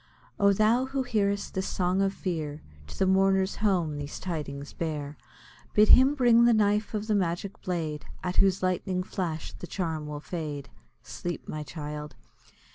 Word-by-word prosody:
Oh! 200 0 +5
thou 220 +5 +3
who 270 0 -1
hearest 200 -4 0
this 190 0 -2
song 185 +1 0
of 195 0 +2
fear, 160 -6 -4 0.2
To - - -10
the 190 - +2
mourner's 190 0 +3
home 175 -8 +1
these 145 0 -6
tidings 145 -5 -5
bear. 150 -3 -4 0.6
Bid 210 0 +6
him 265 +3 +7
bring 240 -3 +5
the 235 -1 +5
knife 210 0 +1
of 210 0 -2
the 215 - 0
magic 190 0 -1
blade, 160 -4 -3 0.2
At 180 0 -3
whose 195 -1 +3
lightning 185 0 0
flash 170 -4 -4
the 180 - -9
charm 160 -5 -3
will 150 0 -5
fade. 150 -4 -5 0.3
Sleep, 175 -1 -5
my 155 - -4
child! 150 0 -6
185 Hz, 165 wpm, -28 LUFS, 155-200 Hz, 0.6 s, him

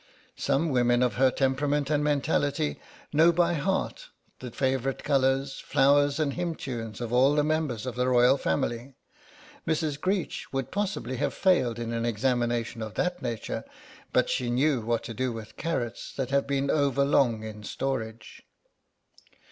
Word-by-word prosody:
Some 140 +4 +1
women 120 -2 +3
of 125 - +1
her 130 +1 +5
temperament 140 +2 0
and 150 -1 +2
mentality 145 0 0 0.3
know 160 +3 +6
by 175 0 +2
heart 190 - -2 0.3
the 125 - -6
favourite 130 +1 -1
colours, 135 -1 +1
flowers 145 +1 +3
and 145 -3 0
hymn 175 -2 -2
tunes 115 -5 -6
of 120 0 -4
all 135 +4 +4
the 150 - +3
members 150 -7 -1
of 130 - -3
the 125 +2 0
Royal 125 +1 +5
Family; 120 - -2 0.7
Mrs. 155 -2 -1
Greech 185 -3 -2
would 135 -1 -3
possibly 195 -10 -2
have - - -1
failed 130 - +2
in 115 0 -4
an 115 0 -1
examination 120 0 0
of 110 -1 -6
that 180 0 -1
nature, 115 -2 -4 0.5
but - - +3
she 125 - -1
knew 130 +1 +2
what 115 +1 -1
to 115 - -6
do 130 +2 -1
with 115 -2 -8
carrots 120 -8 -3
that 135 -1 -3
have 140 0 +2
been 140 0 0
over 140 -2 +2
long 120 -6 +2
in 110 -1 -7
storage. 110 -2 -4
135 Hz, 160 wpm, -27 LUFS, 120-145 Hz, 0.7 s, know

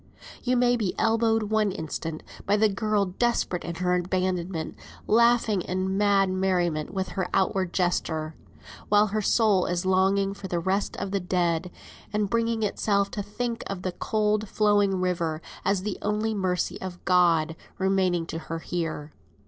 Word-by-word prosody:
You 250 0 +1
may 245 0 +3
be 205 -6 -1
elbowed 225 0 +2
one 215 -2 +2
instant 160 -1 -5 0.2
by 205 +1 +3
the 220 +1 +4
girl 205 0 +1
desperate 190 -2 -1
in 170 - -5
her 180 +1 0
abandonment, 180 -2 -1 0.3
laughing 230 -3 +3
in 185 +2 -2
mad 200 -1 +3
merriment 180 -5 0
with 190 -1 -2
her 185 -2 -3
outward 190 -1 +1
gesture, 160 -4 -1 0.6
while 210 0 +5
her 215 +1 -1
soul 205 -3 +3
is 175 +1 -1
longing 195 +1 +2
for 200 -1 -8
the 175 - -2
rest 190 +4 -1
of 195 - -4
the 200 - +1
dead, 180 -1 0 0.4
and 210 -2 -1
bringing 230 -1 +1
itself 200 -1 +1
to 210 - -3
think 230 +3 -4
of 185 -2 -5
the 185 - -1
cold 215 +2 0
flowing 205 -3 +2
river 170 -4 -1 0.2
as 195 -1 +1
the 205 -1 -3
only 210 +2 0
mercy 185 -4 -1
of 180 -1 -7
God 170 -3 +3 0.2
remaining 190 -3 +1
to 165 - -5
her 165 0 -5
here. 165 -3 -4
190 Hz, 160 wpm, -26 LUFS, 180-210 Hz, 0.6 s, while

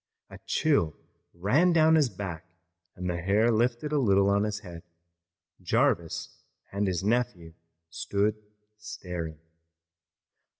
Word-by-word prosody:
A - - -10
chill 140 - +1 0.4
ran 130 - +2
down 160 -1 +5
his 150 -5 +4
back 95 -4 -6 0.5
and 90 0 -5
the 85 -1 -2
hair 105 +6 +3
lifted 120 +6 0
a 150 - +2
little 100 -5 +3
on 100 +1 +2
his 105 0 -3
head. 85 -5 -10 0.8
Jarvis 85 -1 0 0.3
and 100 +1 -1
his 95 -1 -1
nephew 105 -7 -1 0.4
stood 100 +5 0 0.4
staring. 90 -6 -6
100 Hz, 120 wpm, -28 LUFS, 90-120 Hz, 0.8 s, down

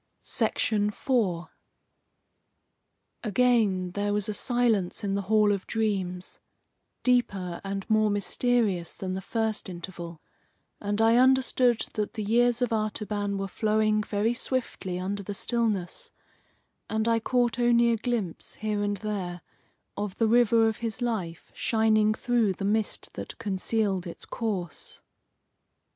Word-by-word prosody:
IV 210 +4 0 2.1
Again 215 -5 +2
there 205 +2 -1
was 205 0 0
a 215 - -2
silence 225 -4 +1
in 200 -1 -1
the 200 - 0
Hall 210 +1 +3
of 200 -2 -2
Dreams, 190 -5 -2 0.6
deeper 200 -8 +1
and 195 0 -4
more 215 -1 +3
mysterious 205 -3 +1
than 185 -1 -4
the 190 - -3
first 220 0 -1
interval, 170 -2 -7 0.6
and 205 +2 0
I 225 +1 +5
understood 255 -2 +4
that 210 -2 -2
the 215 - -2
years 240 +3 +3
of 240 - 0
Artaban 210 -2 -1
were 195 0 -2
flowing 215 +1 +1
very 210 +2 0
swiftly 240 -7 -3
under 195 +3 -3
the 200 +1 -6
stillness, 215 -6 -1 0.8
and 220 +1 0
I 230 0 +3
caught 245 +1 +1
only 235 -1 +4
a - - +3
glimpse, 220 -7 -3
here 210 -1 -2
and 205 0 0
there, 185 -4 -4 0.5
of 205 -2 -4
the 225 - +3
river 230 -1 +5
of 220 - -1
his 235 +1 -3
life 190 -9 -3
shining 215 -1 +2
through 235 -5 +1
the 195 - -5
mist 215 +1 0
that - - -7
concealed 195 -1 -1
its 170 - -8
course. 195 -8 -5
215 Hz, 130 wpm, -27 LUFS, 195-230 Hz, 2.1 s, I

